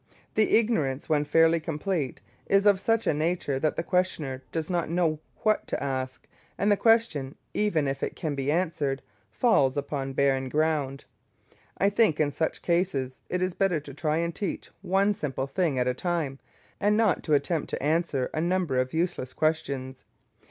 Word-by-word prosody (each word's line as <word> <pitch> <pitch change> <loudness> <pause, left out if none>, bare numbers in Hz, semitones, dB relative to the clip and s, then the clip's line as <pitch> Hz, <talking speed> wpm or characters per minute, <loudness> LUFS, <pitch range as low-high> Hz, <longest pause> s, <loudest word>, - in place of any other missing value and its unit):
The 215 0 +4
ignorance, 155 - 0
when 150 -1 +2
fairly 165 +2 +4
complete, 160 -2 -3 0.3
is 195 +1 +3
of 200 -2 +5
such 225 +3 +1
a - - +3
nature 155 -3 -1
that 155 +2 0
the - - -2
questioner 160 -8 -1
does 160 -1 -2
not 175 -3 -1
know 165 -3 +1 0.2
what 215 -1 +2
to - - -2
ask, 130 -1 -3 0.3
and 205 +1 +2
the - - +6
question, 225 - +2 0.2
even 175 -9 +1
if 135 0 -2
it - - -2
can 155 -3 -3
be 140 0 -1
answered, 155 -5 -1 0.3
falls 140 - +3
upon 140 -1 -3
barren 135 -1 +1
ground. 150 -2 0 0.7
I 200 +1 +3
think 205 -7 +3
in 150 -2 +2
such 160 +2 -2
cases 170 -8 0
it 180 0 0
is 185 -1 -1
better 185 -4 +1
to 140 -1 -10
try 155 +2 0
and 170 0 -1
teach 200 +1 -4
one 195 +2 +2
simple 135 -7 -3
thing 145 0 0
at 125 0 +1
a 125 - +2
time, 150 -2 -2 0.4
and 210 +1 +3
not 220 -6 +3
to 155 - +3
attempt 150 +3 0
to - - -4
answer 150 -4 0
a 155 - -1
number 175 -6 +1
of 130 +3 -1
useless 165 -7 -1
questions. 140 -4 -1
155 Hz, 180 wpm, -27 LUFS, 140-185 Hz, 0.7 s, the